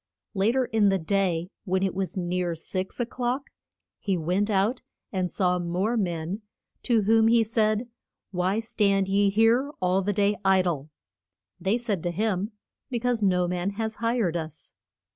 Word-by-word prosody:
Later 230 +6 +2
in 220 -4 +3
the 195 - +2
day, 180 0 0
when 185 0 0
it 195 - 0
was 190 +1 -3
near 175 -1 -1
six 185 +6 -5
o'clock, 245 +3 -2 0.5
he 195 -2 0
went 180 +6 0
out 210 +5 +1 0.3
and 185 -2 -1
saw 180 -2 +1
more 180 +7 -1
men, 180 -1 -2 0.4
to 230 -4 +2
whom 225 +2 +4
he 230 0 +5
said, 215 +1 +1 0.4
Why 185 +2 0
stand 200 -4 +1
ye 200 +1 +3
here 225 +6 +3
all 185 +1 +2
the 200 +2 0
day 205 +1 +2
i 190 -1 +4
dle? 155 -5 -2 0.7
They 195 +5 +1
said 220 -7 -2
to 175 - -1
him, 205 +2 -1 0.4
Be 245 -3 -1
cause 245 -1 0
no 180 -3 +2
man 180 +1 -1
has 220 -1 -2
hired 230 -7 0
us. 160 -2 -6
195 Hz, 160 wpm, -26 LUFS, 180-225 Hz, 0.7 s, he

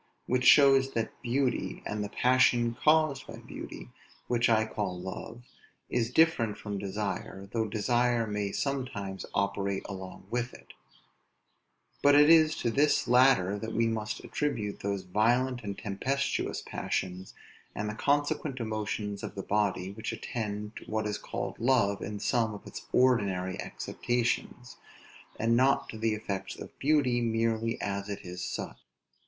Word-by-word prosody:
Which 125 0 0
shows 135 -1 +7
that 115 -1 -3
beauty, 125 +2 -1
and 105 0 -2
the 100 - -4
passion 125 -1 +3
caused 150 0 +2
by - - -8
beauty, - - -9 0.4
which 120 -1 +2
I 110 -1 +4
call 100 -5 -3
love, 95 +6 -7 0.5
is 120 -2 +1
different 125 -7 +3
from 100 -2 -5
desire, 100 -1 -4
though 110 -1 0
desire 120 +2 +1
may 105 -2 -2
sometimes 125 -9 -3
operate 100 0 0
along 95 -1 -8
with 125 +1 -2
it; - - -15 1.3
but 145 0 +6
it 150 +2 +7
is 155 -1 +6
to 115 - -1
this 145 +2 +3
latter 120 -6 +4
that 110 +1 -5
we 115 - +2
must 110 -2 -2
attribute 115 -9 -2
those 100 -1 -2
violent 120 +6 +1
and 100 -1 -5
tempestuous 130 +7 -2
passions, 95 0 -3 0.4
and 105 - -2
the 105 - -3
consequent 145 +1 0
emotions 110 -2 -3
of - - -6
the 95 - -4
body 100 -3 0
which 110 +2 -5
attend 105 -2 -4 0.2
what 110 0 -1
is 105 -1 -2
called - - -5
love 115 -5 +2
in 105 +1 -5
some 110 0 +1
of 100 - -11
its - - -9
ordinary 100 -8 +2
acceptations, 120 -1 -2 0.6
and 115 +1 +3
not 130 +3 +3
to 110 - -6
the 110 -1 +1
effects 100 -3 -4
of - - -9
beauty 135 -4 +2
merely 115 0 0
as 100 0 -3
it 100 - -4
is 90 -1 -6
such. - - -5
115 Hz, 150 wpm, -29 LUFS, 100-125 Hz, 1.3 s, shows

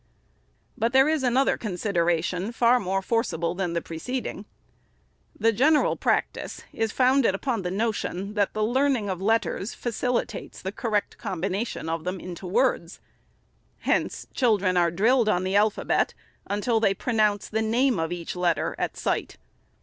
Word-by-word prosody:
But 230 +2 +1
there 265 +2 +6
is 310 -2 +1
another 260 +1 +2
consideration 180 -1 -1
far 240 +1 +4
more 195 -2 -1
forcible 175 -7 0
than 180 -2 -2
the 170 - -2
preceding. 215 +5 -5 0.9
The 225 +1 +4
general 295 +8 +3
practice - - -1
is 225 -1 -1
founded 255 -5 +3
upon 230 +1 -2
the 180 - -3
notion 200 -1 -2
that 205 -1 0
the 215 - 0
learning 245 -3 +1
of 185 -1 -5
letters 220 0 0
facilitates 245 +1 -3
the 190 - -4
cor 230 +3 -4
rect 210 -1 -1
combination 195 +2 -3
of 165 0 -2
them 180 +2 -3
into 180 +1 -7
words. 195 -4 0 0.8
Hence - - 0
children 205 -7 +2
are 175 -1 +4
drilled 220 +6 +3
on 185 -3 +1
the 190 +1 -1
alphabet, 210 +1 +2 0.3
until 215 +3 +1
they 195 -3 +2
pronounce 215 -3 +1
the 220 +1 -1
name 235 0 +2
of 165 +1 -1
each 175 0 -5
letter 170 -3 0
at - - -2
sight. - - -2
205 Hz, 150 wpm, -25 LUFS, 180-235 Hz, 0.9 s, there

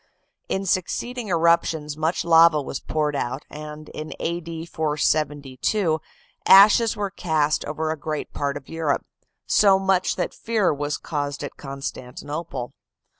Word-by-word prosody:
In 195 +1 -1
succeeding 230 +6 -1
eruptions 165 -3 +2
much 160 +3 -1
lava 165 -2 +6
was 140 -1 -4
poured 150 -1 -1
out; 130 +1 -3
and 150 0 -8
in 155 0 -7
A. 170 +1 -1
D. 165 -1 -7
472, 155 +2 0 0.5
ashes 210 +3 +7
were 200 -2 -2
cast 155 -4 0
over 155 +1 -2
a 160 - -4
great 155 0 -4
part 140 0 -2
of 135 - -12
Europe, 165 -3 -1 0.4
so 195 -2 +5
that 195 - -5
much 190 -1 +2 0.2
fear 220 -7 +1
was 145 0 -2
caused 145 -2 -4
at - - -6
Constantinople. 135 0 -6
155 Hz, 135 wpm, -23 LUFS, 145-175 Hz, 0.5 s, ashes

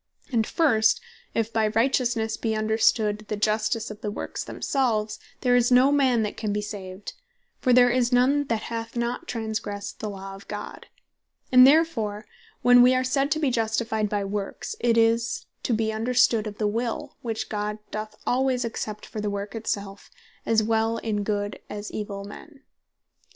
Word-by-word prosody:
And 225 -3 +1
first, 220 -9 +3 0.4
if 225 0 -1
by 220 -1 +2
Righteousnesse 230 0 +1
be 220 -1 -1
understood 215 -1 +2
the 210 - -2
Justice 215 +1 0
of 215 0 -10
the 210 - -2
Works 205 - -5
themselves, 220 -6 -1 0.2
there 250 -1 +3
is 245 0 +3
no 255 +3 +6
man 260 -5 +3
that 210 - -3
can 215 -2 -3
be 205 - 0
saved; 200 -2 -7 0.5
for 255 - +2
there 245 0 +6
is 245 0 +1
none 265 +4 +3
that 225 -4 -2
hath 230 0 -5
not 235 +1 -2
transgressed 220 -3 -4
the 215 - -4
Law 195 -1 -7
of 195 +1 -12
God. - - -7 0.6
And 255 0 +9
therefore 230 -9 +2 0.4
when 245 0 +7
wee 250 +1 +6
are 255 - +2
said 275 +2 +1
to 310 - -3
be 290 -4 +1
Justified 220 -2 0
by 205 -1 -1
Works, 205 - -4
it 235 -1 +2
is 230 +1 +2 0.2
to - - -2
be 220 -1 +1
understood 225 -1 +2
of 210 -1 -7
the 215 - -1
Will, 230 +2 -3
which 225 -2 -3
God 210 0 -3
doth 215 0 -5
alwaies 255 -1 +1
accept 215 -2 -5
for 215 - -6
the 210 - -1
Work 200 0 -4
it 225 -1 -7
selfe, 200 -1 -4 0.4
as 220 -1 +3
well 225 +1 +1
in 215 -2 -2
good, 205 0 -2
as 210 0 -6
in - - -5
evill 200 -1 -5
men. 270 +8 -12
225 Hz, 180 wpm, -25 LUFS, 210-245 Hz, 0.6 s, And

